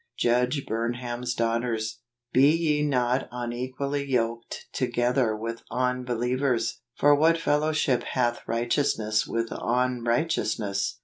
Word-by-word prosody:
Judge 125 +3 +1
Burnham's 120 +1 -2
Daughters. 115 -1 -1 0.2
" 120 0 -52
Be 135 +3 +6
ye 155 -2 +2
not 130 -3 +1
unequally 130 +4 -3
yoked 115 -3 -2
together 120 -2 +1
with 115 +1 -5
unbe¬ 125 0 -1
lievers: 125 -1 0 0.2
for 145 0 +5
what 160 +3 +4
fellowship 150 -5 +1
hath 120 -1 -1
righteousness 115 -2 +1
with 115 0 -1
unrighteousness 120 -4 0
125 Hz, 110 wpm, -26 LUFS, 115-135 Hz, 0.2 s, Be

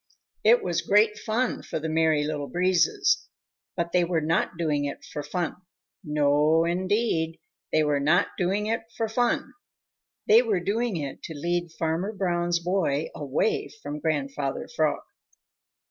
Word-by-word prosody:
It 235 +3 +5
was 170 -2 0
great 210 +1 +4
fun 235 +3 -1
for - - -5
the 160 +1 -3
Merry 160 -1 +2
Little 150 -1 -3
Breezes. 185 - +2 0.5
But 170 -1 -1
they 180 -1 +3
were 170 -1 +1
not 160 +2 0
doing 150 -4 0
it 140 - -6
for 150 - -5
fun. 165 +4 -3 0.5
No, 150 +1 +3
indeed, 180 -2 0 0.3
they 155 - +3
were 145 -1 +1
not 155 +5 +3
doing 195 +3 0
it 225 +1 0 0.2
for 225 - 0
fun! 240 +2 0 0.7
They 220 +3 +7
were 220 -6 0
doing 210 +3 -1
it 140 -3 -5
to 160 - -7
lead 175 +2 -1
Farmer 165 +5 -1
Brown's 175 -3 0
boy 170 -4 0
away 145 +9 -1
from 145 +1 -5
Grandfather 140 -3 -2
Frog. - - +1
170 Hz, 145 wpm, -26 LUFS, 150-200 Hz, 0.7 s, They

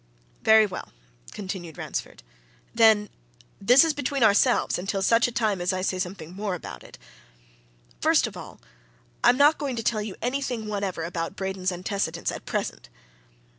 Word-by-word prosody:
"Very 220 0 +6
well," 190 - -7 0.4
continued 185 -5 -7
Ransford. - - -6 0.5
"Then 220 -2 +5 0.5
this 250 +9 +6
is 320 - +1
between 280 -2 -1
ourselves, 220 +2 +3
until 195 +1 -2
such 230 +3 +3
time 210 -5 0
as 175 - +1
I 185 0 -2
say 185 -1 -1
something 180 -3 -5
more 200 -2 -2
about 65 - -9
it. - - -14 1.0
First - - +3
of - - -7
all, - - -10 0.6
I - - +7
am 250 - +4
not 290 +3 +5
going 275 -4 -2
to 230 - -4
tell 215 -1 0
you 210 -2 -6
anything 250 -3 -2
whatever 200 -5 -3
about 165 0 -4
Braden's 190 -1 -2
antecedents 185 +3 -2
at - - -9
present! - - -4
205 Hz, 160 wpm, -25 LUFS, 185-235 Hz, 1.0 s, I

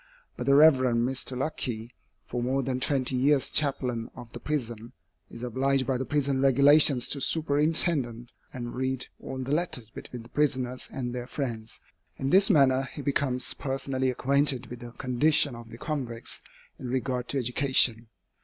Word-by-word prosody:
But 125 - -6
the 140 - +5
Rev. 150 -1 +7
Mr. 125 +1 0
Luckey, 120 -5 -3 0.3
for 120 - -4
more 130 +3 0
than 130 0 -2
twenty 130 -1 0
years 135 +2 +2
chaplain 125 -6 0
of 120 -2 -11
the - - -6
prison, 120 -6 -4 0.4
is 115 - -9
obliged 130 +2 0
by 130 -1 -1
the 130 - -2
prison 140 -2 0
regulations 140 -1 +5
to 140 - -2
superintend 145 -5 +1 0.2
and 120 -2 -6
read 130 0 -1
all 130 0 -6
the 130 - -5
letters 140 -9 -2
between 120 0 -9
the 115 - -15
prisoners 130 -3 0
and 125 -2 -4
their 125 0 -5
friends. 115 -6 -5 0.4
In 135 +1 -2
this 195 +3 +5
manner 135 -6 +3
he 145 - -8
becomes 135 -3 -1
personally 135 -1 -2
acquainted 135 0 +1
with 125 - -7
the 120 -1 -9
condition 140 +3 +2
of 115 -1 -11
the 115 - -10
convicts 125 -6 -4 0.4
in 130 - -6
regard 125 0 -2
to 140 - -1
education. 125 -2 +2
130 Hz, 165 wpm, -27 LUFS, 120-140 Hz, 0.4 s, Rev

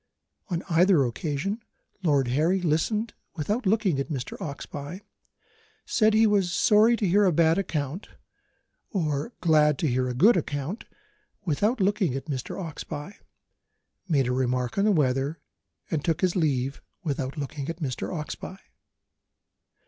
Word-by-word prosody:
On 175 -3 -2
either 175 -2 +4
occasion, 150 - -2 0.4
Lord 140 -7 +2
Harry 160 +9 +2
listened 185 +7 0 0.2
without 205 - -1
looking 195 -8 +2
at 140 - -3
Mr. 135 -6 -4
Oxbye 145 +4 -6 0.8
said 215 -2 +3
he 220 +1 +6
was 200 -4 +2
sorry 220 +5 +5
to 205 - 0
hear 200 +4 +4
a 185 - +4
bad 165 +2 +3
account 160 -1 -3 0.8
or 155 - -1
glad 150 -3 +4
to 155 - 0
hear 130 0 0
a 125 - -3
good 200 - +6
account, 150 - -3 0.6
without 205 - +1
looking 195 - +1
at 135 - -4
Mr. 135 0 -4
Oxbye 160 +1 -6 0.9
made 145 -7 +2
a 125 - 0
remark 125 -1 0
on 200 - +3
the 215 - +4
weather, 140 -1 +1 0.5
and 155 -2 -1
took 165 -2 0
his 185 -2 +2
leave, 135 -6 0 0.2
without 140 -2 -3
looking 140 0 -4
at 165 - -4
Mr. 135 -8 -3
Oxbye. 175 +3 -6
160 Hz, 140 wpm, -26 LUFS, 140-195 Hz, 0.9 s, he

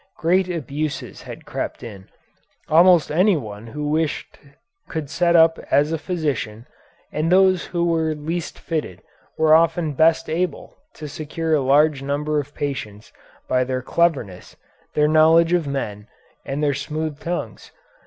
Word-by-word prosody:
Great 185 +3 +2
abuses 155 -2 -4
had - - -10
crept - - -5
in. 100 -5 -10 0.6
Almost 170 +1 +5
anyone 145 - 0
who 150 +5 -5
wished 155 0 -2 0.5
could 150 -3 -5
set 175 0 +2
up 165 0 +5
as 145 +2 +3
a 165 - -1
physician, 145 - -3 0.5
and 155 +3 -1
those 185 -1 +4
who 170 -1 -1
were 160 -2 0
least 160 +3 -4
fitted 150 - -4 0.3
were 160 -1 +4
often 165 -1 +3
best 160 +3 +3
able 170 -1 -3 0.2
to 155 - -7
secure 160 +2 -3
a 150 - +3
large 145 +2 +3
number 150 +2 -1
of 145 0 -7
patients 110 -7 -5 0.3
by 130 0 +2
their 130 0 -3
cleverness, 135 - -1 0.4
their 150 0 +3
knowledge 160 +2 +5
of 170 -4 +1
men, 105 -7 -4 0.4
and 140 +2 -3
their 145 -1 +2
smooth 150 +2 -4
tongues. 175 +1 -5
155 Hz, 145 wpm, -21 LUFS, 140-165 Hz, 0.6 s, Almost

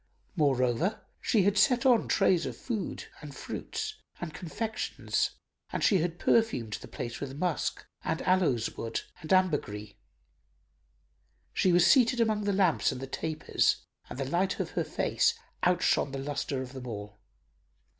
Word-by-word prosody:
Moreover, 140 - +1 0.2
she 210 -5 +3
had 205 +2 +3
set 250 +1 +4
on 245 -4 +5
trays 190 -4 +3
of - - -6
food 220 -6 -4 0.2
and 145 -2 -9
fruits 435 - -5 0.2
and 165 -3 -5
confections 215 +8 -2 0.3
and - - -2
she 195 - +5
had 170 +1 -1
perfumed 195 - +2
the - - -9
place 120 0 -5
with 140 -1 -6
musk 175 0 -1 0.2
and - - -1
aloes 170 -12 +2
wood 115 0 -3 0.2
and 160 -3 -8
ambergris. 145 - +1 1.6
She 185 - +3
was 175 0 +5
seated 250 -2 +5
among 215 -2 +2
the 205 - +2
lamps 190 -5 +3
and - - -5
the 135 - -4
tapers 155 +3 0 0.2
and - - -7
the 135 - -2
light 175 +7 0
of - - -2
her - - 0
face - - +1 0.3
outshone 175 -5 +2
the - - -2
lustre 140 -1 -2
of 130 +1 -10
them 130 -1 -7
all. 105 -2 -7
170 Hz, 155 wpm, -29 LUFS, 130-200 Hz, 1.6 s, on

